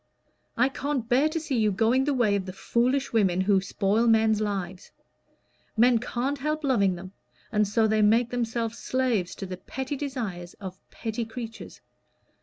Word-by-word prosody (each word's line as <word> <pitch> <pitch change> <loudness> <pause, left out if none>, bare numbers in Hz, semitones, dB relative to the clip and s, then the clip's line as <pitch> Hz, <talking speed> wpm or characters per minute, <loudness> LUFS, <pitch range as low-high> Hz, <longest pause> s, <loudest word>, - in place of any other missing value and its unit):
"I 250 +3 +4
can't 270 -3 -3
bear 265 +6 +3
to 330 - -2
see 290 -6 -1
you 215 -1 +3
going 230 +7 +2
the 290 - +1
way 220 -5 +3
of 195 -1 -2
the 185 - -5
foolish 250 +7 0
women 190 -5 +3
who 195 0 +3
spoil 205 +4 +1
men's 220 -1 +4
lives. 190 -3 -3 0.9
Men 240 +1 +5
can't 255 +4 -2
help 305 +3 -2
loving 200 -9 +2
them, 185 +2 -9 0.4
and 210 -1 +2
so 220 +2 +2
they 215 0 +2
make 230 +3 +3
themselves 230 -1 -2
slaves 245 -8 0
to 195 - -6
the 185 -1 -6
petty 265 +8 -5
desires 230 -12 -5
of 190 -2 -8
petty 225 0 -4
creatures. 225 0 -8
225 Hz, 170 wpm, -26 LUFS, 200-255 Hz, 0.9 s, Men